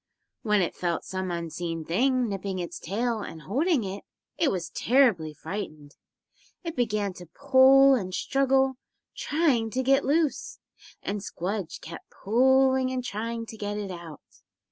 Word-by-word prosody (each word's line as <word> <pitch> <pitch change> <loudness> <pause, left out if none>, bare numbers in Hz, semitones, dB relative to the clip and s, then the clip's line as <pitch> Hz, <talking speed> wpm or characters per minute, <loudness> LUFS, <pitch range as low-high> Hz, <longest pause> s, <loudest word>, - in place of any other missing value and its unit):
When 210 -3 +2
it 170 - -2
felt 170 -2 -2
some 185 -1 -4
unseen 170 -1 -4
thing 250 - +1
nipping 195 -2 -4
its 175 -1 -5
tail 225 +5 -1
and 165 -6 -8
holding 285 - +1
it, 195 +1 -6 0.3
it 325 - +2
was 180 -6 -3
terribly 230 - +3
frightened. 155 -4 -7 0.7
It 335 -2 -5
began 215 -5 0
to 175 -1 -12
pull 270 - +6
and 195 -8 -1
struggle, 265 +4 +1 0.4
trying 285 -8 +1
to 255 +3 -1
get 270 +2 +3
loose, 300 +1 0 0.5
and 205 0 -3
Squdge 190 -1 -4
kept 165 0 -10
pulling 260 +3 +3
and 255 -1 -3
trying 230 +1 -4
to 220 - -10
get 205 0 -3
it 200 -2 -4
out. 170 -4 -9
215 Hz, 145 wpm, -27 LUFS, 185-265 Hz, 0.7 s, pull